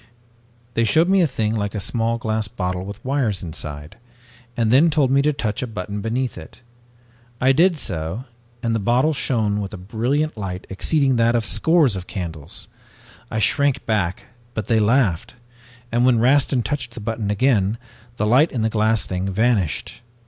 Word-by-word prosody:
"They 115 - +1
showed 155 +10 +3
me 195 0 +4
a 170 - +4
thing 110 -5 -1
like 105 -1 -2
a - - -1
small 115 +4 0
glass 110 -2 -2
bottle 90 -5 -3
with 100 +4 -9
wires 130 -9 0
inside, 75 0 -7 0.6
and 115 -2 +1
then 145 +7 +6
told 145 -4 +2
me 135 +1 +4
to 150 +2 +2
touch 110 -7 -3
a 125 - -2
button 105 -1 -5
beneath 115 -2 -2
it. 80 - -13 0.8
I 130 +1 +4
did 170 +5 +3
so 85 - -2 0.4
and 115 -1 0
the 115 - +1
bottle 125 +9 +2
shone 110 -7 0
with 100 +1 -5
a - - -8
brilliant 120 +11 -1
light 95 -3 -5
exceeding 135 +6 +2
that 115 +1 +3
of 115 -2 +1
scores 140 - +3
of 90 -1 -6
candles. 85 -7 -6 0.6
I - - -3
shrank 140 +6 +1
back, 100 -5 -1 0.3
but 110 - -2
they 110 0 +2
laughed, 115 -1 +1 0.6
and 120 +1 +2
when 125 -2 +4
Rastin 130 +1 +3
touched 125 0 -4
the - - -6
button 110 -1 -3
again, 105 -1 +2 0.4
the 105 - 0
light 130 +9 +4
in 115 -4 -2
the 110 - 0
glass 110 -1 +1
thing 95 +1 -3
vanished. 105 - 0
115 Hz, 180 wpm, -21 LUFS, 100-130 Hz, 0.8 s, then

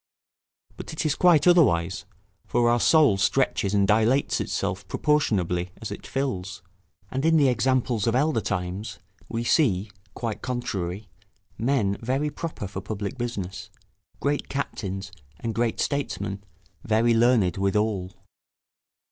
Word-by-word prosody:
But - - -7
it 155 - -3
is 150 - +2
quite 170 -3 +4
otherwise; 95 - +3 0.4
for 120 0 +2
our 120 - +2
soul 145 -7 +5
stretches 100 -2 +1
and 100 -1 +3
dilates 110 +6 +2
itself - - -3
proportionably 95 - +1
as 110 -3 -6
it 100 - -7
fills; 100 -10 -3 0.5
and 135 +1 -2
in 160 0 +4
the 140 -3 +5
examples 125 -2 +1
of 115 - +2
elder 140 -3 +2
times, 95 +2 -3 0.3
we 115 0 -2
see, 110 - +2 0.2
quite 115 -3 -4
contrary, 100 -6 -3 0.5
men 115 -5 +1
very 135 +5 -1
proper 155 -9 -5
for 95 0 -6
public 100 +3 -5
business, 100 -6 -4 0.5
great 145 +1 -1
captains, 100 -8 -4 0.3
and 115 +3 -3
great 115 +1 -1
statesmen 100 -8 -2 0.4
very 115 +2 +3
learned 115 -6 +3
withal. 100 -1 0
115 Hz, 130 wpm, -25 LUFS, 100-135 Hz, 0.5 s, soul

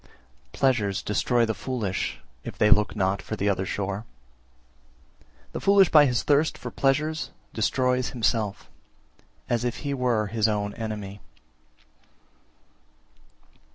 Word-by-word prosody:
355. - - -12
Pleasures 110 -8 +2
destroy 120 +3 +1
the 110 - -1
foolish, 110 -6 -3 0.2
if - - -8
they 105 0 +3
look 105 0 +4
not 95 +1 0
for 110 - -5
the 100 -1 -1
other 95 -1 0
shore; 100 +1 -3 1.5
the - - -5
foolish 195 -2 +5
by 150 -2 +7
his 125 -2 0
thirst 150 +2 +2
for 125 -1 -7
pleasures 150 +5 0 0.2
destroys 125 +2 +1
himself, 110 -4 -1 0.8
as 120 -1 0
if 120 -1 -3
he 140 - -1
were 125 -5 +1
his 110 +1 +1
own 105 -1 -1
enemy. 105 -3 -6
115 Hz, 125 wpm, -25 LUFS, 105-130 Hz, 1.5 s, by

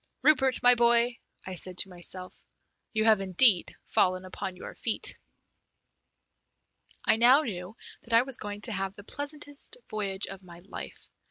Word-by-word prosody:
"Rupert, 265 -5 +4
my 245 0 +8
boy," 235 0 +3 0.3
I 185 - -6
said 180 0 -3
to 190 - -2
myself, 180 +1 -6 0.5
"you 220 -2 0
have 215 -3 +5
indeed 190 0 +4
fallen 185 0 +1
upon 185 0 -6
your - - -9
feet!" - - -1 1.9
I - - +4
now 250 +5 +6
knew 195 - -6 0.2
that 230 - -4
I 230 +1 +6
was 265 -1 -2
going 205 0 -6
to 230 - -3
have 195 -1 -3
the 205 - -12
pleasantest 290 - -5
voyage 200 -2 -2
of 195 0 -9
my 175 -2 -13
life. - - -9
215 Hz, 155 wpm, -28 LUFS, 185-245 Hz, 1.9 s, my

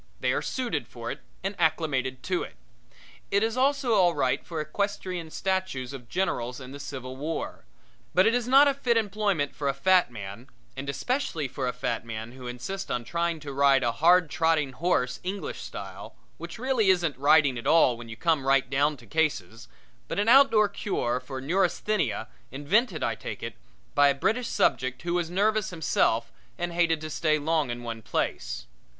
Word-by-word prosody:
They - - +1
are - - 0
suited 170 - -2
for 120 -1 -6
it - - -6 0.2
and 195 +1 -2
acclimated 140 -6 0
to 180 -1 0
it. - - -7 0.7
It 200 +1 +2
is 225 +1 0
also 270 -1 +2
all 180 -5 +4
right - - +1
for 165 -2 -5
equestrian 180 +1 -3
statues 185 -9 -2
of 125 -4 -10
generals 125 -10 -1
in 130 -1 -9
the 140 - -8
Civil 130 -2 -6
War. 150 - -4 0.5
But 185 +1 +6
it 225 - +4
is 245 -1 0
not 275 +3 +7
a 280 - +3
fit 250 -4 +1
employment 205 -8 0
for 145 - -3
a 135 - -1
fat 180 +2 +4
man 105 +1 -8 0.3
and 135 +1 -5
especially 245 - -1
for 130 0 -3
a - - +1
fat 125 -2 -3
man 115 0 -6
who 130 0 -9
insists 125 +11 -5
on 125 -1 -1
trying 170 +4 -1
to 145 -2 -6
ride 140 -1 +4
a 120 - +2
hard 170 +3 +4
trotting 160 -5 +2
horse 125 -4 0
English 195 +2 -4
style, - - -8 0.2
which - - -7
really 245 -4 +1
isn't 175 -5 +2
riding 145 0 +4
at - - -5
all 145 -7 +5
when 115 0 -10
you 115 - -7
come 155 -4 +1
right 135 -1 +4
down 145 +2 +2
to 120 - -16
cases, 115 - -1 0.4
but - - -4
an 205 +2 +1
outdoor 235 -4 +6
cure 160 -11 -2
for 130 +1 -7
neurasthenia 180 - 0 0.2
invented, 160 - +1
I - - +1
take - - -7
it, - - -4 0.4
by 145 - +5
a 140 - +3
British 230 - 0
subject 130 - 0
who 170 0 -1
was 175 -2 0
nervous 210 +3 +1
himself 115 -8 +1 0.3
and 175 0 -3
hated 165 -2 +2
to 155 - -5
stay 155 0 +2
long 155 -2 0
in 120 0 -5
one 115 -1 -5
place. - - -3
155 Hz, 190 wpm, -27 LUFS, 130-190 Hz, 0.7 s, not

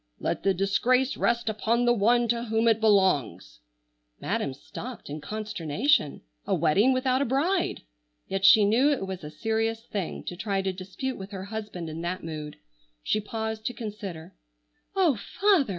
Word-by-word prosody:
Let - - -2
the 195 0 +2
disgrace 245 +8 +2
rest 235 -1 0
upon 225 +2 +1
the 240 - +5
one 240 +2 +3
to 235 +1 0
whom 225 0 +1
it 225 -1 +4
belongs!" 190 - +2 0.6
Madam 140 - -1
stopped 240 - -9
in 150 +1 -5
consternation! 210 - 0 0.2
A - - +2
wedding 205 +12 +3
without 255 0 +1
a - - +2
bride! 320 +9 0 0.4
Yet 195 0 -2
she 205 +2 +8
knew 240 +8 +4
it 280 -9 0
was 190 -3 -6
a 150 - -6
serious 225 +7 -1
thing 195 -5 -4
to 175 - -5
try 195 0 -1
to 190 -1 -1
dispute 190 +8 -5
with 190 +1 -7
her 195 -2 -6
husband 205 -4 -6
in 160 +1 -6
that 180 +2 -3
mood. 155 -2 -6 0.5
She 215 - +1
paused 220 +1 -4
to 245 - -4
consider. 205 -7 -7 0.6
"Oh, 345 - +3 0.2
father!" 390 - +4
215 Hz, 165 wpm, -27 LUFS, 190-240 Hz, 0.6 s, she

